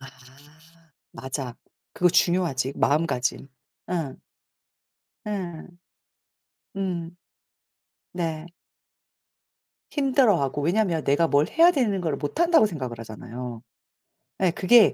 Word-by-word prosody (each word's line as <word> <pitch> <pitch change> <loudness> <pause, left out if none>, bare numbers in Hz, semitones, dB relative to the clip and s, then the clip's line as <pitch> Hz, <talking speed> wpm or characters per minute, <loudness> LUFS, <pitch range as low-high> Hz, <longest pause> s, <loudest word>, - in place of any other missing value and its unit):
아 135 - -10 1.1
맞아. 130 -2 -5 0.4
그거 180 - +3
중요하지, 170 -7 +1
마음가짐. 140 -3 0 0.4
예. 160 -7 -2 1.1
예. 180 -6 -4 1.1
음. 175 -3 -3 1.0
네. 165 -2 -3 1.5
힘들어하고 240 - +2
왜냐면 170 -1 +1
내가 145 +4 +3
뭘 145 +2 +3
해야 335 +2 +6
되는 230 - 0
거를 160 -5 -1
못한다고 325 - +3
생각을 130 - -5
하잖아요. 115 +1 -8 0.8
예 185 - +3
그게 210 +6 +5
165 Hz, 195 characters per minute, -25 LUFS, 140-195 Hz, 1.5 s, 해야